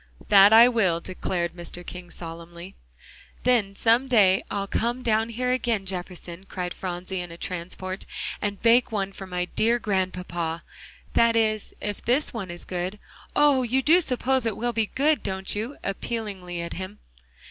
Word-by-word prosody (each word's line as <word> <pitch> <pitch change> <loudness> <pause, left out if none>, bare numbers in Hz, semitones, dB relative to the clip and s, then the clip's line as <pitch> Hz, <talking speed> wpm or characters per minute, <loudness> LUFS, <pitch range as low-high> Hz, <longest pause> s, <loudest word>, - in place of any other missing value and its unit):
"That 200 0 +8
I 230 +2 +9
will," 195 -9 +2
declared 175 -1 -3
Mr. 175 0 -7
King 180 -1 -8
solemnly. 170 +2 -9 0.7
"Then 230 -6 +2
some 235 +5 +3
day 200 -7 +4
I'll 200 -1 -2
come 240 +5 -1
down 220 0 +2
here 250 +2 -1
again, 235 -5 0
Jefferson," 180 0 -6
cried 180 -1 -4
Phronsie 185 +1 -4
in 175 -1 -6
a 170 - -9
transport, 185 +2 -5 0.3
"and 205 -2 -2
bake 235 +1 +5
one 200 -2 -1
for 195 0 -8
my 180 -1 -2
dear 235 +2 +3
Grandpapa. 180 -5 -2 0.5
That 230 0 +4
is, 215 -2 +1
if 205 -1 -4
this 255 +6 +1
one 200 -6 -5
is 175 0 -8
good. 180 +3 -3 0.4
Oh! 290 -3 +5
you 255 +2 +1
do 340 +6 +6
suppose 260 -3 0
it 220 - -2
will 240 +1 -1
be 225 -1 +1
good, 300 +3 +3
don't 190 0 -2
you?" 225 +7 -4
appealingly 195 -4 -4
at 170 - -5
him. 190 +3 -6
195 Hz, 165 wpm, -25 LUFS, 180-235 Hz, 0.7 s, I